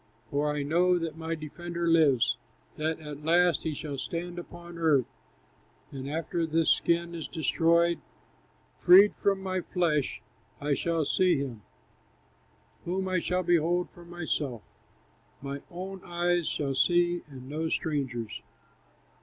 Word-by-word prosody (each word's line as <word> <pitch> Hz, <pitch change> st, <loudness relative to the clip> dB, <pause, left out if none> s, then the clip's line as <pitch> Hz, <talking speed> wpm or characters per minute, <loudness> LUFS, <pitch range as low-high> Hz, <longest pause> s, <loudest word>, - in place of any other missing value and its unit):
"For 145 Hz, +1 st, +1 dB
I 150 Hz, -1 st, -2 dB
know 175 Hz, +5 st, +3 dB
that 165 Hz, -2 st, -3 dB
my 165 Hz, 0 st, -3 dB
Defender 170 Hz, +2 st, -5 dB
lives, 155 Hz, -7 st, +4 dB, 0.4 s
That 155 Hz, +1 st, -1 dB
at 150 Hz, -1 st, -8 dB
last 175 Hz, 0 st, +4 dB
he 155 Hz, -2 st, -3 dB
shall 145 Hz, -2 st, -5 dB
stand 175 Hz, +4 st, -4 dB
upon 175 Hz, 0 st, -10 dB
earth; 150 Hz, -6 st, +3 dB, 0.9 s
And 135 Hz, 0 st, -6 dB
after 165 Hz, +2 st, -2 dB
this 160 Hz, 0 st, +3 dB
skin 170 Hz, 0 st, +1 dB
is 165 Hz, -2 st, -5 dB
destroyed. 170 Hz, +1 st, +2 dB, 0.8 s
Freed 190 Hz, +3 st, +7 dB
from 195 Hz, -1 st, 0 dB
my 185 Hz, -1 st, -1 dB
flesh, 165 Hz, -6 st, 0 dB, 0.4 s
I 145 Hz, 0 st, 0 dB
shall 165 Hz, +3 st, 0 dB
see 180 Hz, +3 st, +3 dB
him, 130 Hz, -6 st, -4 dB, 1.2 s
Whom 190 Hz, +2 st, -2 dB
I 185 Hz, -2 st, +1 dB
shall 180 Hz, +2 st, -1 dB
behold 175 Hz, +1 st, +2 dB
for 175 Hz, -, -14 dB
myself; 160 Hz, -8 st, -3 dB, 0.8 s
My 140 Hz, +1 st, -5 dB
own 190 Hz, +2 st, -7 dB
eyes 175 Hz, -1 st, 0 dB
shall 140 Hz, -2 st, -1 dB
see, 175 Hz, +4 st, +3 dB
and 130 Hz, -2 st, -10 dB
no 155 Hz, +3 st, -2 dB
stranger's." 125 Hz, -10 st, -2 dB
165 Hz, 135 wpm, -29 LUFS, 150-175 Hz, 1.2 s, Freed